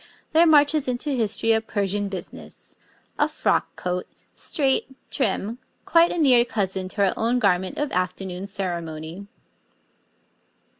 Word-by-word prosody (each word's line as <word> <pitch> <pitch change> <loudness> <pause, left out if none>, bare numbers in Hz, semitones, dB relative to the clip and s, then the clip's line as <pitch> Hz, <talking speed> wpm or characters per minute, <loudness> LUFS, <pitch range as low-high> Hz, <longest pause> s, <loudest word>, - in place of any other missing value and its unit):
there 330 +2 +6
marches 295 -2 +4
into 255 +4 -1
history 225 -3 +1
a 220 0 +3
Persian 205 -2 -2
business 190 -2 -10 0.4
a - - +3
frock - - -1
coat, 180 0 -3 0.3
straight, 270 -2 0 0.2
trim, 225 -1 -1 0.3
quite 335 0 +4
a - - -3
near 260 -7 +5
cousin 190 -5 -2
to 200 +1 0
our - - 0
own 235 +3 0
garment 190 -5 +1
of 295 -1 -2
afternoon 185 +1 -3
ceremony. 175 -2 -4
205 Hz, 130 wpm, -23 LUFS, 185-265 Hz, 0.4 s, there